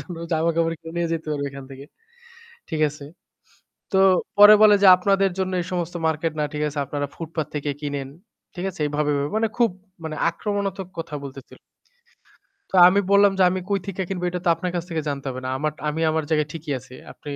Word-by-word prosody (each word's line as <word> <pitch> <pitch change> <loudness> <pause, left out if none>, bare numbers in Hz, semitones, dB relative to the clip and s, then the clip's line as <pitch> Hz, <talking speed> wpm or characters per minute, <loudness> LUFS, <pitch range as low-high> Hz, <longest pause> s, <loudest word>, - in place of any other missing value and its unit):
জন্য 175 -3 -8 0.2
জামাকাপড় 165 +1 +1
কিনে 165 0 -10
নিয়ে 170 -1 0
যেতে 160 -1 -3
পারবো 145 -1 -2
এখান 135 0 -9
থেকে।" 135 +1 -10 0.9
ঠিক 155 - -2
আছে? 150 0 -11 0.9
তো 190 - +3 0.4
পরে 205 +1 +10
বলে 210 -1 +8
যে - - +7
"আপনাদের 195 +1 +2
জন্য 185 0 -1
এই 170 - -5
সমস্ত 175 -1 -3
মার্কেট 160 +1 -1
না। - - +1
ঠিক 150 - -3
আছে? 145 0 -6
আপনারা 145 +1 -3
ফুটপাত 160 -2 -4
থেকে 145 0 -2
কিনেন।" 140 -2 -4 0.5
ঠিক 180 - -5
আছে? 180 - -14
এইভাবে, 150 0 -1
ভাবে 140 +1 -2
মানে 225 0 +1
খুব 235 -4 +4 0.6
আক্রমণাত্মক 195 0 -3
কথা 165 -2 -5
বলতেছিল। 135 -1 -11 1.1
তো - - -15
আমি 200 +2 +3
বললাম 200 0 +5
যে - - +5
"আমি 185 +1 -2
কই 200 -1 +1
থিকা 190 -1 -3
কিনবো 180 -2 -4
এটা 180 0 -4
তো - - +1
আপনার 175 +2 -4
কাছ 175 -1 -2
থেকে 160 -2 -2
জানতে 140 -1 -4
হবে 130 0 -6
না। - - -3 0.4
আমি 150 +2 -2
আমার 160 0 -1
জায়গায় 150 -2 +1
ঠিকই 160 -2 -5
আছি। 125 +1 -15 0.2
আপনি 145 - -10
165 Hz, 195 wpm, -23 LUFS, 150-185 Hz, 1.1 s, পরে